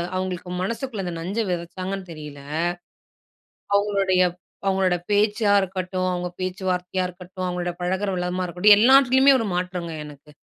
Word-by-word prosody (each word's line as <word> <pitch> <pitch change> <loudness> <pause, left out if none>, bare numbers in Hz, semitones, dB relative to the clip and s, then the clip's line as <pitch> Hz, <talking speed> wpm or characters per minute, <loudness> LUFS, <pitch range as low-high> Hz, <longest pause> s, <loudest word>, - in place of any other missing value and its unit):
அவங்களுக்கு 185 -1 -3
மனசுக்குள்ள 225 +1 -3
இந்த 175 - -3
நஞ்ச 190 +7 -3
வெதச்சாங்கன்னு 185 +2 -4
தெரியல. 150 -3 -9 1.4
அவங்களுடைய 200 -2 +2 0.4
அவங்களோட 190 -2 +2
பேச்சா 205 0 +3
இருக்கட்டும், 185 -1 -2
அவங்க 180 0 -2
பேச்சுவார்த்தையா 185 0 -2
இருக்கட்டும், 180 +1 -8
அவங்களோட 175 0 -2
பழகுற 190 +3 -1
விதமா 180 +1 -2
இருக்கட்டும், 180 +4 +6
எல்லாத்திலயுமே 265 +3 +6
ஒரு 225 - -1
மாற்றங்க 180 -2 -3
எனக்கு. 150 0 -13
185 Hz, 120 wpm, -23 LUFS, 180-200 Hz, 1.4 s, இருக்கட்டும்